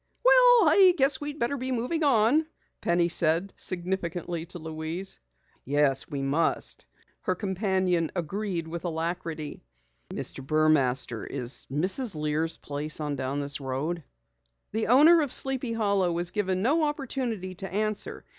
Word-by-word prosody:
"Well, - - +7
I 375 -3 +6
guess 270 0 +3
we'd 295 0 -5
better 240 +3 -1
be 260 0 -4
moving 255 +7 -1
on," 275 +3 +3 0.3
Penny 170 0 +2
said 170 +3 0
significantly 175 -2 -3
to 180 - -6
Louise. 160 +3 -4 0.4
"Yes, 140 -1 +1
we 140 -3 -3
must," 145 +5 0 0.3
her 185 - -1
companion 185 -3 0
agreed 180 0 -3
with 170 +1 -6
alacrity. 165 -2 -4 0.5
"Mr. 135 - -5
Burmaster, 135 -6 +1
is 130 -2 -6
Mrs. 185 - +2
Lear's 155 +2 -1
place 150 +2 -1
on 150 -2 -2
down 135 +2 -2
this 140 0 -1
road?" 145 +6 -3 0.7
The 220 +1 -1
owner 310 +7 +7
of 285 -4 -2
Sleepy 265 -3 0
Hollow 200 -5 +1
was 170 +1 -1
given 190 -2 -1
no 305 +7 +2
opportunity 255 -10 -3
to 190 +2 -8
answer. 215 +1 -2
180 Hz, 135 wpm, -27 LUFS, 155-235 Hz, 0.7 s, Well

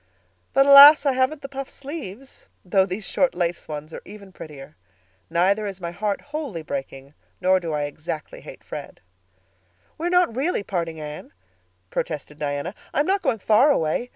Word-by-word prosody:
But, 275 - +5
alas! 280 +1 +10
I 280 - +4
haven't 260 +3 0
the - - -4
puffed 275 -1 -6
sleeves—though 255 - -4
these 195 +2 -4
short 270 -7 +1
lace 175 -1 -2
ones 155 +1 -7
are - - -7
even 200 -1 -12
prettier. 145 - -11 0.5
Neither 190 +5 +2
is 195 -1 -7
my 170 -2 -5
heart 200 +3 -2
wholly 285 - -6
breaking 135 -1 -6 0.3
nor 185 +1 +3
do 170 -3 -5
I 150 -1 -1
exactly 150 +1 -6
hate - - -12
Fred." - - -9 1.0
"We 335 - -1
are - - 0
not 360 -9 +3
really 275 - 0
parting, 170 -5 -3
Anne," 150 0 -8 0.6
protested 150 -1 -4
Diana. 145 +4 -3 0.2
"I'm 290 - +2
not 390 +2 +1
going 265 -7 0
far 220 +7 +4
away. 235 - 0
195 Hz, 165 wpm, -23 LUFS, -, 1.0 s, alas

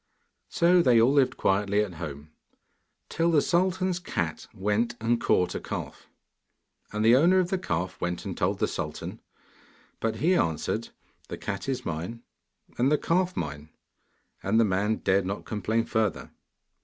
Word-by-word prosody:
So 175 +1 +4
they 125 -7 +5
all 120 +5 +4
lived 140 -3 +3
quietly 100 +1 +2
at 105 -4 -3
home, 75 -1 -7 0.8
till 165 +1 0
the 160 -3 +4
sultan's 185 +2 +1
cat 85 - -3
went 105 +5 -1
and 115 +1 +1
caught 90 - +2
a - - -3
calf. - - -6 0.8
And 105 +1 -1
the 115 +2 +7
owner 170 +8 +5
of 185 -1 +1
the 190 - +1
calf 90 - -3
went 90 0 -3
and - - -4
told - - 0
the - - +1
sultan, - - -5 0.8
but 110 -1 -1
he 160 +11 +2
answered, 80 - 0 0.4
'The - - -6
cat - - -4
is 130 -2 -2
mine, 85 +9 -5 0.6
and 130 +4 +3
the 150 - +4
calf 180 +3 0
mine,' 75 -1 -5 0.7
and 110 +4 +2
the 115 - +5
man 100 +2 +1
dared 95 -2 +1
not 100 +1 -4
complain 110 +1 -1
further. 110 -3 -1
110 Hz, 160 wpm, -27 LUFS, 95-150 Hz, 0.8 s, the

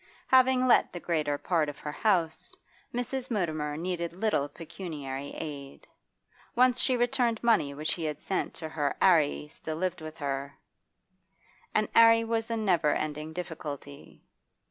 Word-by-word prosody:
Having 260 0 +5
let 250 - +4
the 175 - -6
greater 155 -4 0
part 160 -1 +1
of 145 - -8
her 150 - -5
house, 170 -3 0 0.4
Mrs. 245 +2 -3
Mutimer 155 -9 -1
needed 170 0 -3
little 180 -7 0
pecuniary 145 -4 -6
aid; 140 -3 -7 0.7
once 250 0 +4
she 255 -2 +2
returned 240 -1 +1
money 215 -12 +3
which 155 +2 -1
he 165 - -4
had 150 -2 -3
sent 190 - -2
to 160 - -6
her 150 -3 -1
'Arry 155 -5 +3
still 155 +1 -6
lived 185 0 -2
with 155 +1 -8
her, 140 -1 -4 1.2
and 215 - +3
'Arry 230 0 +7
was 225 0 -1
a 230 - -1
never 175 -8 +2
ending 155 +1 -3
difficulty. 150 -5 -7
165 Hz, 145 wpm, -29 LUFS, 150-225 Hz, 1.2 s, Arry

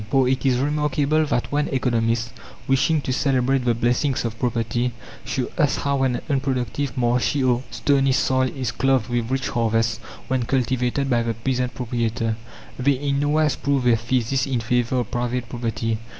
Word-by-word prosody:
For 135 -1 +3
it 130 +1 +1
is 125 -2 +3
remarkable 150 +2 +1
that 120 - -1
when 145 +1 +1
economists, 115 -3 0 0.4
wishing 135 +3 +2
to 130 - -2
celebrate 135 -1 +1
the 120 -1 +2
blessings 120 +3 0
of 115 -1 -4
property, 120 0 -1 0.3
show 130 - -2
us 150 -3 +3
how 140 -1 0
an 130 -2 +1
unproductive, 135 -1 -1
marshy, 125 +2 +1
or 125 -1 +2
stony 135 -2 +2
soil 130 0 +2
is 130 -4 -3
clothed 130 -3 +1
with 120 -1 -1
rich 130 0 -1
harvests 115 -1 +1 0.3
when 130 -2 0
cultivated 130 +1 0
by 120 -3 +2
the 115 -1 -2
peasant 125 +2 -2
proprietor, 115 -2 -1 0.4
they 140 +3 +3
in 140 +1 -1
nowise 150 +1 +2
prove 140 -2 0
their 120 -1 +4
thesis 125 +3 0
in 130 -3 0
favour 120 +2 +1
of 115 - -7
private 120 0 -2
property. 115 -2 -2
125 Hz, 165 wpm, -23 LUFS, 120-135 Hz, 0.4 s, their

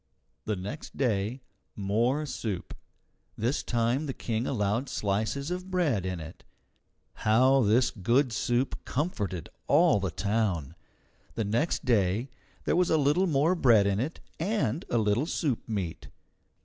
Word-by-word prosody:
The 105 - 0
next 100 +11 -7
day, 115 0 0 0.3
more 115 +9 +1
soup. 105 -9 -4 0.6
This 120 +6 0
time 120 +5 0
the 135 - -4
King 115 +1 -2
allowed 115 +2 0
slices 110 - -1
of 180 +1 -4
bread 145 - +1
in 90 -2 -3
it. 80 +1 -10 0.8
How 130 +5 +4
this 120 +3 +3
good 120 +6 +1
soup 120 +4 -1
comforted 105 - -2 0.2
all 105 - +5
the 95 -1 -1
town! 100 -6 -1 0.6
The 115 - -1
next 120 +10 0
day 115 +1 +1 0.3
there - - +2
was 180 0 +3
a 160 - +4
little 150 +6 +3
more 155 +2 +3
bread 120 - +5
in 100 0 +1
it 140 +8 -3 0.2
and 165 - 0
a 120 - +1
little 110 +6 +1
soup 140 -10 -2
meat. 95 -7 -3
120 Hz, 140 wpm, -28 LUFS, 105-140 Hz, 0.8 s, all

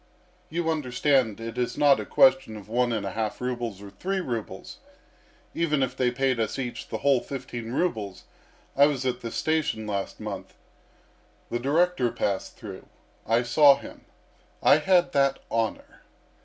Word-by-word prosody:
You 165 0 -1
understand 130 -5 +1
it 115 +1 -6
is 125 - -1
not 145 -2 +5
a - - -5
question 180 - +4
of 105 - -11
one 120 +2 +1
and 110 -3 -2
a 100 - -3
half 110 +1 -3
rubles 120 -5 -4
or 100 - -10
three 195 - -2
rubles 120 - -5 0.7
even 155 -4 +1
if 130 -1 -2
they 125 -1 +2
paid 130 0 0
us 110 - -1
each 125 -3 -5
the - - -4
whole 140 -3 +5
fifteen 120 -3 -6
rubles. 110 - -2 0.5
I 140 +1 +6
was 135 -3 -2
at 125 -1 -1
the 115 - -4
station 155 -5 -1
last 100 -2 -4
month. 100 -3 -7 1.0
The 120 - -1
director 145 -1 +2
passed 100 -2 -2
through. - - -9 0.4
I 115 +2 +3
saw 140 +3 +6
him. - - -12 0.6
I 145 - +7
had 175 +3 +3
that 140 -1 +2
honour. 115 -2 -2
125 Hz, 160 wpm, -26 LUFS, 115-145 Hz, 1.0 s, I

